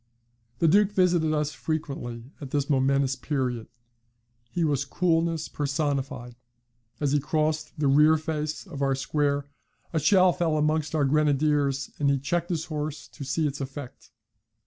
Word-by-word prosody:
The 165 - +3
Duke 200 +5 +4
visited 175 -4 +3
us 150 -1 0
frequently 130 -4 -4 0.2
at 140 - -6
this 145 +2 -1
momentous 135 0 +2
period; 125 -7 -2 0.8
he 170 +8 -1
was 145 -3 +1
coolness 165 +1 0
personified. 140 -4 -2 0.7
As 145 -2 0
he 145 - +3
crossed 155 +3 -1
the 150 - +1
rear 150 +3 +5
face 155 0 -3
of 155 -7 -8
our 135 -1 +2
square 140 +1 0 0.5
a 160 - +2
shell 185 +3 +5
fell 165 -3 0
amongst 155 +1 0
our 150 -2 +2
grenadiers, 145 -1 +1
and 145 -1 +2
he 140 - +3
checked 170 +6 -1
his 165 -2 -1
horse 150 -2 -4
to - - -9
see 140 +4 0
its 145 -1 -2
effect. 135 -1 -8
150 Hz, 150 wpm, -26 LUFS, 140-160 Hz, 0.8 s, rear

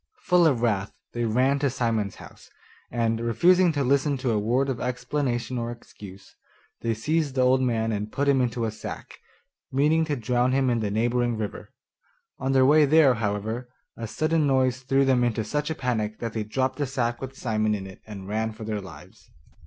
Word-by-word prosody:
Full 180 -2 +4
of 125 -6 +1
wrath 100 -4 0 0.2
they 120 0 -1
ran 130 +5 +2
to 140 0 +1
Simon's 115 -5 -1
house, - - -14 0.4
and, 115 -1 0
refusing 175 +10 +4
to 145 -2 0
listen 140 +2 +2
to 130 -2 -1
a 110 - +1
word 125 +6 +1
of 130 -3 -2
explanation 125 0 -2
or 115 0 -3
excuse, 100 -4 -12 0.5
they 115 -1 0
seized 150 +4 -1
the 130 - +2
old 130 +1 +4
man 115 -3 0
and 105 0 -3
put 140 +1 -1
him 135 -2 +4
into 120 -1 -1
a 110 - -2
sack, 110 - -8 0.5
meaning 150 +4 +3
to 150 -2 -1
drown 125 +1 +1
him 130 -1 +2
in 120 - +1
the 105 -2 -1
neighbouring 120 +2 0
river. 105 -2 -5 0.7
On 135 0 -1
their 130 -1 +5
way 150 +2 +6
there, 145 -2 +5
however, 110 +2 -3 0.3
a 115 - -5
sudden 155 +5 +1
noise 130 -2 +2
threw 135 +1 +2
them 130 -2 +3
into 115 -2 0
such 150 +7 -2
a 160 - -2
panic 110 -6 -2
that 115 -2 -5
they 110 - -2
dropped 130 +5 -1
the 145 - 0
sack 120 -2 -2
with 135 0 -7
Simon 110 -2 0
in 95 -2 -6
it 95 -1 -12
and 100 -3 -8
ran 110 +2 -2
for 110 +1 -10
their 105 -1 -3
lives. 95 - -14
125 Hz, 200 wpm, -25 LUFS, 110-135 Hz, 0.7 s, way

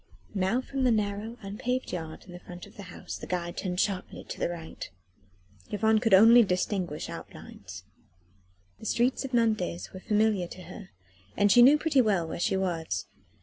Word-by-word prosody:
Now 195 +5 +1
from 270 0 -3
the 255 - +4
narrow 215 +1 -1
unpaved 240 +6 -3
yard 160 -3 -6
in 175 -1 -10
front 180 0 -10
of - - -17
the - - -9
house - - -7
the - - -9
guide 175 -1 -3
turned 180 -2 -3
sharply 195 -2 -2
to - - -8
the - - 0
right. 165 -2 -7 0.8
Yvonne 220 +1 +2
could 225 -4 +5
only 230 +5 +8
distinguish 180 -5 -1
outlines. 95 -1 -10 1.0
The 220 - -7
streets 245 +6 +1
of 265 - -6
Nantes 215 -7 0
were 185 - -7
familiar 210 -2 +1
to 185 - -10
her, 190 - -10 0.5
and 205 0 +4
she 245 - +7
knew 275 +5 +8
pretty 295 -3 +3
well 195 -8 +1
where - - -5
she 190 - +1
was. 165 - -2
200 Hz, 175 wpm, -28 LUFS, 175-225 Hz, 1.0 s, only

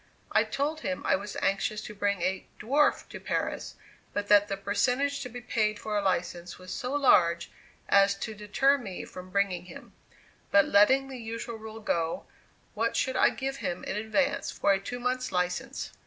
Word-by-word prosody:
I - - +4
told 300 +3 -2
him 185 -8 -3
I - - +4
was 200 +2 -6
anxious 200 +2 0
to 210 - -7
bring 200 -3 -1
a 185 +1 -1
"dwarf" 280 +7 +2
to - - -8
Paris, - - -3 0.4
but 205 0 -2
that 205 0 +6
the 195 -1 -3
percentage 250 +8 0
to 250 - -5
be 245 +1 -8
paid 215 -3 0
for 215 0 -4
a 205 - +2
license 180 -2 -2
was 185 0 -8
so 250 - -3
large 170 -12 +4 0.4
as 200 0 +5
to 220 +2 -5
deter 215 +7 +2
me 195 -7 -6
from 185 0 -10
bringing 185 -2 0
him; - - -12 0.6
but 200 0 +6
letting 260 +7 +5
the 265 -2 -7
usual 230 0 -5
rule 220 0 -8
go, 165 -5 -1 0.5
what - - 0
should - - 0
I - - +5
give 270 +1 -4
him 175 -8 -3
in - - -3
advance 265 +7 0
for 200 - +2
a 195 - +1
two 245 +5 -6
months' 255 +1 -1
license? 180 -1 -2
210 Hz, 185 wpm, -29 LUFS, 195-250 Hz, 0.6 s, that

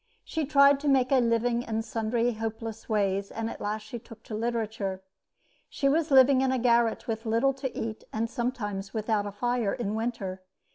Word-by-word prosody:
She 315 -4 -3
tried 280 -1 +6
to 290 - -4
make 265 -2 +3
a 270 - +5
living 235 0 +1
in 225 -2 -2
sundry 230 +1 0
hopeless 225 0 -5
ways, 200 -2 0
and 225 0 -4
at - - -9
last 210 +1 -2
she 225 +3 -7
took 230 -1 -14
to - - -9
literature. 220 -4 -2 0.7
She 275 - 0
was 315 +3 +2
living 265 -1 +6
in 265 -1 +2
a 260 - +1
garret, 235 -2 +2
with 225 -1 -3
little 230 +5 +2
to 265 -1 -4
eat, 220 -1 -4
and 225 +1 -1
sometimes 225 -5 -3
without 215 -1 0
a - - -5
fire 240 0 0
in 215 -4 -3
winter. 220 -5 -3
230 Hz, 190 wpm, -28 LUFS, 215-250 Hz, 0.7 s, tried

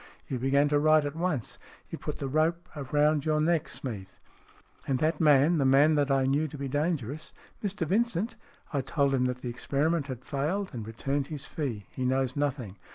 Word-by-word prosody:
You 130 - -3
began 140 +3 +3
to 145 0 +3
write 155 0 +4
at 145 +1 -4
once. 165 - -2 0.3
You've - - -6
put - - -4
the 140 - -3
rope 160 +5 +1 0.2
round 150 0 +3
your 155 -1 +1
neck, 160 0 +1
Smeath." 100 -7 -7 0.7
"And 135 - +1
that 155 +3 0
man 150 +2 +5
the - - +3
man 140 +4 +5
that 145 -2 +2
I 135 -1 +3
knew 145 +4 +1
to 150 - -9
be 140 0 -4
dangerous? 145 -1 -2
" - - -24
" - - -32
Mr 200 -3 -1
Vincent? 225 +3 0 0.4
I 140 - +1
told 140 +1 +1
him 125 -1 +2
that 125 0 -2
the 125 - -2
experiment 140 +5 0
had 130 -2 -7
failed, 160 +8 -2
and 115 -3 -6
returned 135 +5 -2
his 150 -3 -6
fee. 120 - -4
He 130 - -4
knows 130 0 +1
nothing. 135 -9 -2
145 Hz, 205 wpm, -28 LUFS, 130-155 Hz, 0.7 s, man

